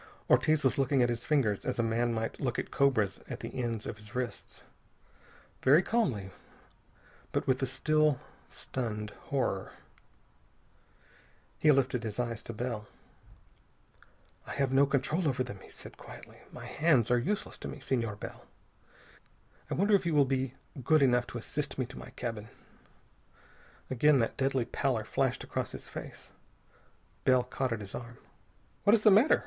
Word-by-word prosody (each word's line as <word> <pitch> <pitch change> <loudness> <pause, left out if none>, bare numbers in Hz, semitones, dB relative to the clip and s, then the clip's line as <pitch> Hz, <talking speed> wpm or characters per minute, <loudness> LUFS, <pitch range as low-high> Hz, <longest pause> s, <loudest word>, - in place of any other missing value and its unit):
Ortiz 155 -1 +4
was 130 +1 +2
looking 135 -1 +3
at 120 - +2
his 120 0 -3
fingers 125 -10 +2
as - - -2
a 115 - +2
man 115 +1 +1
might 115 0 -3
look 125 -4 -1
at - - -3
cobras 110 -8 +2
at - - -5
the - - -6
ends 115 -3 -2
of - - -5
his 105 0 -13
wrists. 125 -1 -4 1.0
Very 150 +7 +6
calmly, 125 - 0 1.0
but - - -1
with 130 0 +1
a 135 - +1
still, 150 +2 +2 0.3
stunned 105 -4 -4
horror. 125 -8 -1 1.9
He 155 - +4
lifted 130 -4 +3
his 110 -1 -5
eyes 115 -2 -2
to 115 - -6
Bell. 115 -2 -4 1.6
"I - - -5
have 135 -2 0
no 140 +1 +5
control 145 +5 0
over 130 -2 +1
them," 125 -6 -8
he - - -14
said - - -10
quietly. - - -12
"My - - -9
hands 145 -8 +2
are 125 - +5
useless 200 +12 -2
to - - -6
me, - - -7
Senor 120 -5 -1
Bell. 105 - -9 1.2
I - - -1
wonder 205 +3 +2
if 190 -3 +4
you 165 - +1
will 145 -1 +6
be 130 -1 -1 0.3
good 155 0 +5
enough 125 -2 +3
to - - -6
assist 145 +5 -3
me 130 - 0
to 125 - -10
my - - -9
cabin." 115 -2 -4 1.4
Again 145 +3 +5
that 115 -3 0
deadly 135 -2 +1
pallor 125 -2 0
flashed 130 +3 0
across - - -3
his - - -8
face. - - -9 0.9
Bell 130 -1 +4
caught 130 0 -2
at 115 -2 -2
his 100 -1 -9
arm. 120 -1 -7 0.7
"What 205 - +7
is 215 - -1
the 215 - +8
matter?" 220 +10 +6
130 Hz, 165 wpm, -31 LUFS, 115-140 Hz, 1.9 s, the